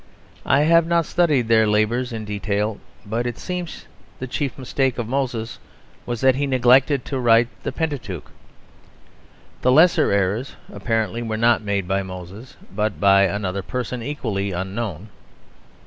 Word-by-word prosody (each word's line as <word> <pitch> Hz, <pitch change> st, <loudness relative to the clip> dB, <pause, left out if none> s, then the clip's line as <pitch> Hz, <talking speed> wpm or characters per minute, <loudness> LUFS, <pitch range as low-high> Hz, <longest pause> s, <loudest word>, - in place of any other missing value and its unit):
I 140 Hz, +3 st, +4 dB
have 165 Hz, +2 st, +4 dB
not 170 Hz, -1 st, +2 dB
studied 150 Hz, -10 st, +1 dB
their 110 Hz, -1 st, +4 dB
labours 110 Hz, +4 st, +1 dB
in 110 Hz, -2 st, -5 dB
detail, 105 Hz, +1 st, -2 dB, 0.3 s
but 115 Hz, +4 st, -2 dB
it 120 Hz, -, -4 dB
seems 180 Hz, -2 st, -5 dB
that -, -, -25 dB, 0.3 s
the 130 Hz, -, -5 dB
chief 135 Hz, +2 st, -3 dB
mistake 130 Hz, 0 st, -1 dB
of 120 Hz, -3 st, -3 dB
Moses 120 Hz, -3 st, -3 dB, 0.5 s
was 120 Hz, -2 st, -3 dB
that 130 Hz, 0 st, +5 dB
he 140 Hz, +2 st, -1 dB
neglected 130 Hz, +1 st, +3 dB
to 135 Hz, -, -3 dB
write 115 Hz, -1 st, +4 dB
the -, -, -3 dB
Pentateuch. 140 Hz, -, -4 dB, 1.3 s
The 125 Hz, -, +3 dB
lesser 160 Hz, +6 st, +5 dB
errors, 100 Hz, +6 st, 0 dB, 0.2 s
apparently, 115 Hz, -1 st, -1 dB
were 110 Hz, -2 st, -3 dB
not 115 Hz, 0 st, +3 dB
made 100 Hz, -3 st, -2 dB
by 95 Hz, +1 st, 0 dB
Moses, 95 Hz, +5 st, -10 dB, 0.2 s
but 105 Hz, 0 st, -1 dB
by 100 Hz, -1 st, +5 dB
another 100 Hz, 0 st, -2 dB
person 125 Hz, +3 st, -4 dB
equally 110 Hz, -7 st, -3 dB
unknown. 95 Hz, +1 st, -4 dB
115 Hz, 150 wpm, -22 LUFS, 100-130 Hz, 1.3 s, that